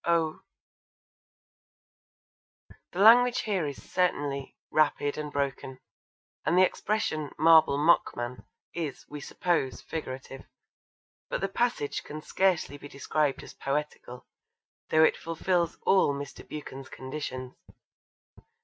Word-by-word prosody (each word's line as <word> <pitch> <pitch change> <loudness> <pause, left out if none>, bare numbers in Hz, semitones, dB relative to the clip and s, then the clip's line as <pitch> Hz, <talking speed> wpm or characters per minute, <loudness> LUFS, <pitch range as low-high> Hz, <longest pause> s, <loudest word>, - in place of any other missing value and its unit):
Oh! 165 -2 +1 2.5
The - - -10
language 235 +4 +7
here 190 -8 -1
is 140 - -7
certainly 145 -6 -1 0.2
rapid 145 -2 +2
and 150 -1 -5
broken, 135 -2 -3 0.7
and 175 - +2
the 185 - +7
expression 165 -8 -1
'marble 160 -2 +6
mockman' 130 -5 +1 0.3
is, 160 -5 -4
we 150 0 -8
suppose, 165 -4 -1
figurative, 135 -4 -7 0.8
but - - -1
the 195 - 0
passage 195 -8 -1
can 155 +1 -8
scarcely 180 -7 +1
be 145 - -9
described 145 0 -1
as - - -11
poetical, 140 -3 -4 0.6
though 155 0 +5
it - - +4
fulfils 170 +1 -1
all 190 -7 +4
Mr. 140 0 -8
Buchan's 135 -3 -8
conditions. 130 -2 -6
150 Hz, 110 wpm, -28 LUFS, 140-170 Hz, 2.5 s, language